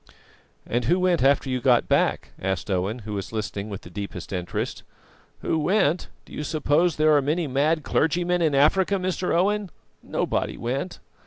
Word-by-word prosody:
'" - - -33 0.2
"And 120 0 -1
who 175 +9 +3
went 180 -2 +2
after 135 +1 +3
you 130 -1 -1
got 120 -1 +3
back?" - - +1
asked 95 +2 -2
Owen, 95 +6 -1
who 105 - -5
was 100 -2 -4
listening 105 -2 -4
with 100 -2 -6
the 90 - -13
deepest 100 +1 -6
interest. 90 -2 -3 0.6
"Who 160 - 0
went? 175 0 +1 0.2
Do - - -15
you 150 - -4
suppose 155 +2 +1
that 155 - -1
there 155 -1 +6
are 145 - +4
many 155 +5 0
mad 150 +4 +1
clergymen 175 +3 +1
in 155 -4 +2
Africa, 185 +8 +3
Mr. 185 -1 -1
Owen? 200 +3 +1 0.3
Nobody - - -2
went." 135 +9 -3
145 Hz, 180 wpm, -24 LUFS, 115-175 Hz, 0.6 s, there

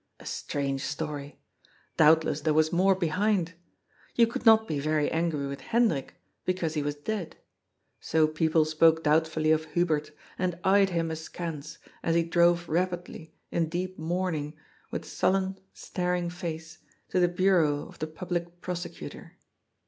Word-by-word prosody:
A - - -14
strange 140 -1 -2
story. 145 -1 -5 0.6
Doubtless 155 -1 +4
there 155 0 +1
was 155 +1 +3
more 190 +2 +4
behind. 185 0 0 0.6
You 235 - +6
could 230 +1 -4
not 220 0 +7
be 150 -3 -1
very 155 0 +1
angry 160 -3 0
with 140 0 -5
Hendrik, 220 - +1 0.3
because 180 -4 -1
he 150 - 0
was 145 0 -2
dead. 175 +2 -4 0.6
So 160 -1 +2
people 155 0 +2
spoke 160 +1 +4
doubtfully 155 0 +2
of 160 0 +2
Hubert, 160 -4 +1 0.3
and 180 -2 -1
eyed 195 0 +5
him 165 -2 -1
askance, 160 -1 -6 0.2
as 165 - +1
he 170 - +4
drove 170 0 +3
rapidly, 175 -1 -3 0.2
in 165 -2 0
deep 185 +2 -4
mourning, 160 -3 -2 0.3
with - - -5
sullen, 190 0 0
staring 180 -1 -2
face, 160 -2 -6 0.3
to 185 - +1
the 175 - +5
Bureau 175 -5 +2
of - - -16
the 155 - -2
Public 175 +1 -4
Prosecutor. 175 -1 -6
165 Hz, 145 wpm, -28 LUFS, 155-180 Hz, 0.6 s, not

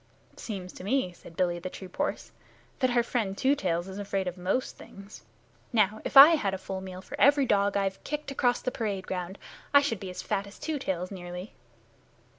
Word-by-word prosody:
"Seems 190 -5 -6
to - - -10
me," 205 -2 0
said 165 -1 -15
Billy 175 -2 +1
to - - -9
the 185 - -4
troop 185 0 -11
horse, - - -2 0.5
"that 255 - +3
our 240 -1 +3
friend 215 -5 -2
Two 270 +2 +3
Tails 175 -8 -1
is 190 +1 -7
afraid 195 -2 -2
of 180 - -3
most 185 +8 -1
things. 200 +1 -12 0.5
Now, 215 -2 +2
if - - 0
I 280 +3 +13
had 215 -13 +1
a - - -4
full 190 0 -6
meal 185 0 -8
for - - -7
every 285 0 +6
dog 200 -3 +2
I've 195 -1 -2
kicked 295 -1 -4
across 245 -2 +1
the 255 - -1
parade 200 -6 -3
ground 185 +1 -4 0.4
I 285 - +9
should 225 -8 -1
be 190 - -6
as 180 - -6
fat 200 -1 -1
as 200 - -13
Two 310 -2 -3
Tails 185 -6 -3
nearly." 180 +1 -7
195 Hz, 215 wpm, -28 LUFS, 185-245 Hz, 0.5 s, I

